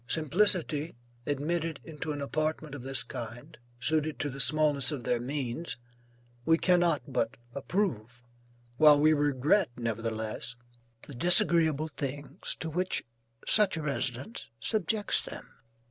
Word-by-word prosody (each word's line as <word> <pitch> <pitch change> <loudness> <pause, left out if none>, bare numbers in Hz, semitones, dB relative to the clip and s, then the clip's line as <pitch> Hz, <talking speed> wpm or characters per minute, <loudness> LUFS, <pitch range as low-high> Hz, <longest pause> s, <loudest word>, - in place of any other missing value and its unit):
Simplicity, 160 - +1 0.3
admitted 160 +2 -1
into 155 -1 -5
an 145 -1 -4
apartment 155 +1 -2
of 145 - -6
this 135 +1 0
kind, 120 +5 -8 0.2
suited 155 +4 0
to 145 - -2
the 135 - -8
smallness 145 +1 +4
of 140 -5 -4
their 120 - +1
means, 130 +1 -3 0.7
we 165 +4 +4
cannot 175 -6 +3
but 125 -1 -1 0.2
approve, 125 - -2 0.5
while 150 0 +7
we 155 +1 +5
regret 145 +5 +2
nevertheless, 115 0 -3 0.5
the 145 - -10
disagreeable 160 +1 +2
things 145 +2 -5
to 160 - -2
which 180 +4 -1 0.4
such 205 -5 +4
a 160 - -3
residence 135 - -3
subjects 210 - +1
them. - - -8
145 Hz, 125 wpm, -30 LUFS, 130-165 Hz, 0.7 s, while